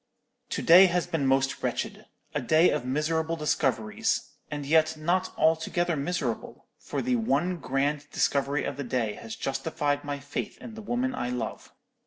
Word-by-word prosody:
"To - - -2
day 180 +3 +9
has 175 -1 0
been 165 -6 -1
most 135 0 +1
wretched—a 145 - -4
day 155 +7 +4
of - - -1
miserable 160 +5 0
discoveries; 130 -8 0 0.2
and 145 -2 -4
yet 160 +1 +3
not 175 +4 0
altogether 165 +2 +2
miserable, 175 +5 -3
for - - -4
the 250 0 +1
one 185 -6 +1
grand 145 0 -1
discovery 140 +1 +1
of - - -4
the 140 - -3
day 120 -4 -1
has 110 +1 -8
justified 145 +1 -1
my 145 -1 -3
faith 140 +1 -5
in 230 - -10
the 220 - -8
woman 245 +4 -1
I 125 - -2
love. 125 -3 -4
150 Hz, 160 wpm, -27 LUFS, 135-175 Hz, 0.2 s, day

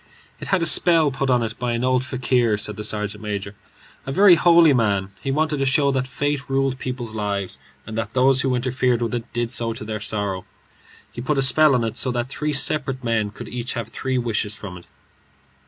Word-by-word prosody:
"It - - -7
had 190 -3 +1
a - - +1
spell 165 -1 +5
put 135 +1 -2
on 125 -2 +2
it 115 0 -5
by 125 -1 -1
an 115 +1 -2
old 130 0 +1
fakir," 125 -3 0
said 105 0 -4
the 105 - -6
sergeant 105 0 -3
major, 100 -1 -5 0.5
"a - - -3
very 195 +4 +6
holy 170 -2 +5
man. 100 -5 0
He - - -4
wanted 155 +2 0
to 135 - 0
show 140 +1 +3
that 130 -1 -1
fate 140 +1 -3
ruled 135 -1 0
people's 125 -3 -5
lives, 100 -3 -3 0.3
and 110 - -8
that 115 0 -5
those 130 +1 +3
who 130 -2 0
interfered 125 -1 0
with 115 - -3
it 120 -2 -5
did 120 -1 -2
so 115 -3 0
to 110 - -7
their 110 0 -4
sorrow. 100 -3 -2 0.7
He 120 - -7
put 140 +4 -1
a 135 - +4
spell 145 +2 +6
on 120 - 0
it 115 - -3
so 130 - 0
that 120 +1 -3
three 150 +2 -3
separate 135 -2 0
men 115 -3 0
could 105 - -10
each 125 0 -4
have 115 -3 -5
three 130 +3 -3
wishes 110 -3 -2
from 95 -3 -9
it." 90 - -13
125 Hz, 220 wpm, -21 LUFS, 110-135 Hz, 0.7 s, very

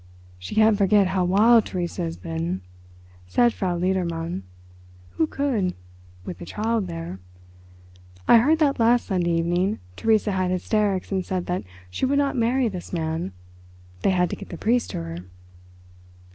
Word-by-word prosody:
"She 90 - -7
can't 215 -1 +4
forget 200 -1 +4
how 185 -1 +1
wild 220 +5 +5
Theresa 175 -2 -3
has 80 0 -3
been," 85 +2 -3 0.7
said 240 - +3
Frau 180 -3 -1
Ledermann. 170 - -1 0.7
"Who 155 - 0
could—with 90 - -4
the - - -7
child 220 +1 -1
there? 165 - -6 1.1
I - - +8
heard 300 +8 +3
that 290 -5 +2
last 235 +1 +4
Sunday 180 -4 0
evening 175 +4 +1 0.2
Theresa 220 -1 +2
had 185 -1 0
hysterics 195 +1 0
and 190 -1 0
said 180 -1 -3
that 180 - -3 0.3
she 260 - 0
would 280 +2 +1
not 280 -1 +1
marry 245 +1 +2
this 185 -5 -6
man. 160 - -2 0.7
They - - +2
had 180 -2 +2
to - - -2
get - - -10
the 175 - -7
priest 240 +6 +1
to 85 - -4
her." 85 0 -6
185 Hz, 155 wpm, -24 LUFS, 165-220 Hz, 1.1 s, I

